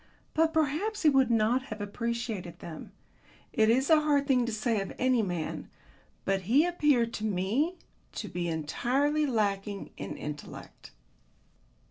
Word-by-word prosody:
But 320 Hz, 0 st, +3 dB
perhaps 320 Hz, +7 st, 0 dB
he 310 Hz, -, +7 dB
would 265 Hz, -3 st, +4 dB
not 235 Hz, +3 st, +2 dB
have 215 Hz, -4 st, -7 dB
appreciated 220 Hz, -3 st, -3 dB
them. 160 Hz, -2 st, -9 dB, 0.6 s
It 220 Hz, -1 st, +4 dB
is 260 Hz, +4 st, +3 dB
a 320 Hz, -1 st, +6 dB
hard 290 Hz, -2 st, +2 dB
thing 250 Hz, -4 st, +2 dB
to -, -, -1 dB
say 215 Hz, 0 st, 0 dB
of 195 Hz, -, -5 dB
any 255 Hz, -2 st, +3 dB
man, 175 Hz, -6 st, -3 dB, 0.6 s
but 195 Hz, 0 st, +1 dB
he 285 Hz, +7 st, +5 dB
appeared 290 Hz, -9 st, +2 dB
to 215 Hz, -, -4 dB
me 220 Hz, -, 0 dB, 0.4 s
to -, -, -5 dB
be 175 Hz, -1 st, -3 dB
entirely 255 Hz, -, 0 dB
lacking 205 Hz, -4 st, -1 dB
in -, -, -6 dB
intellect. 150 Hz, 0 st, -8 dB
235 Hz, 145 wpm, -29 LUFS, 200-285 Hz, 0.6 s, he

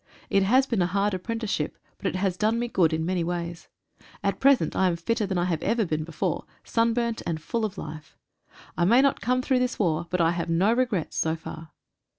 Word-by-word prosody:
It 195 Hz, -, +4 dB
has 255 Hz, +8 st, +4 dB
been 230 Hz, -7 st, 0 dB
a 175 Hz, -, +2 dB
hard 200 Hz, +2 st, 0 dB
apprenticeship, 200 Hz, -4 st, -2 dB, 0.2 s
but -, -, -2 dB
it -, -, -2 dB
has 185 Hz, -1 st, 0 dB
done 215 Hz, +4 st, +1 dB
me 240 Hz, +1 st, -1 dB
good 175 Hz, -8 st, +2 dB
in 160 Hz, 0 st, -1 dB
many 180 Hz, -1 st, 0 dB
ways. 170 Hz, 0 st, -4 dB, 0.6 s
At 200 Hz, 0 st, 0 dB
present 275 Hz, -1 st, +4 dB
I 190 Hz, -, +3 dB
am 175 Hz, -, +1 dB
fitter 210 Hz, +5 st, -1 dB
than 190 Hz, -2 st, -1 dB
I 175 Hz, -, +2 dB
have 170 Hz, -3 st, -1 dB
ever 230 Hz, -2 st, +1 dB
been 155 Hz, -2 st, -1 dB
before 165 Hz, -1 st, -2 dB
— -, -, -36 dB
sunburnt 230 Hz, 0 st, 0 dB
and 160 Hz, -2 st, -1 dB
full 225 Hz, +9 st, -2 dB
of 205 Hz, -2 st, -5 dB
life. 155 Hz, -1 st, -8 dB, 0.6 s
I 175 Hz, -, +1 dB
may 235 Hz, +9 st, +5 dB
not 275 Hz, -, +2 dB
come 255 Hz, +1 st, +1 dB
through 260 Hz, -1 st, +2 dB
this 250 Hz, 0 st, -1 dB
war, 170 Hz, -4 st, 0 dB
but 180 Hz, -, -1 dB
I 165 Hz, -1 st, +4 dB
have 170 Hz, 0 st, -3 dB
no 185 Hz, +7 st, +3 dB
regrets 235 Hz, -9 st, -1 dB
so 160 Hz, 0 st, +1 dB
far. 160 Hz, 0 st, -9 dB
190 Hz, 225 wpm, -26 LUFS, 170-230 Hz, 0.6 s, may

